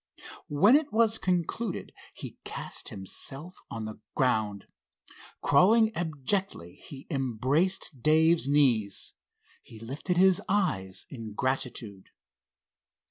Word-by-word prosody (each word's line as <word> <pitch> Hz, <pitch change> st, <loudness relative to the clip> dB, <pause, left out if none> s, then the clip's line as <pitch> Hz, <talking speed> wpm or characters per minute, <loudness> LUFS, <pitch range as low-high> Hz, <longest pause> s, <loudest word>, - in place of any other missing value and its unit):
When 195 Hz, -, +5 dB
it 300 Hz, 0 st, +2 dB
was 225 Hz, 0 st, +3 dB
concluded 185 Hz, +4 st, -2 dB, 0.2 s
he -, -, -9 dB
cast -, -, -4 dB
himself 135 Hz, -, -6 dB
on 110 Hz, -1 st, -5 dB
the 110 Hz, 0 st, -8 dB, 0.2 s
ground. 110 Hz, -7 st, 0 dB, 0.8 s
Crawling 220 Hz, +3 st, +4 dB
abjectly 160 Hz, -, -2 dB
he 135 Hz, -1 st, -11 dB
embraced 135 Hz, -, 0 dB
Dave's 160 Hz, +1 st, +4 dB
knees. 125 Hz, -9 st, +2 dB, 0.5 s
He 110 Hz, -, -14 dB
lifted 140 Hz, -, -3 dB
his 190 Hz, 0 st, +5 dB
eyes 100 Hz, -, 0 dB
in 115 Hz, -5 st, -7 dB
gratitude. 125 Hz, -6 st, -3 dB
145 Hz, 100 wpm, -28 LUFS, 115-185 Hz, 0.8 s, When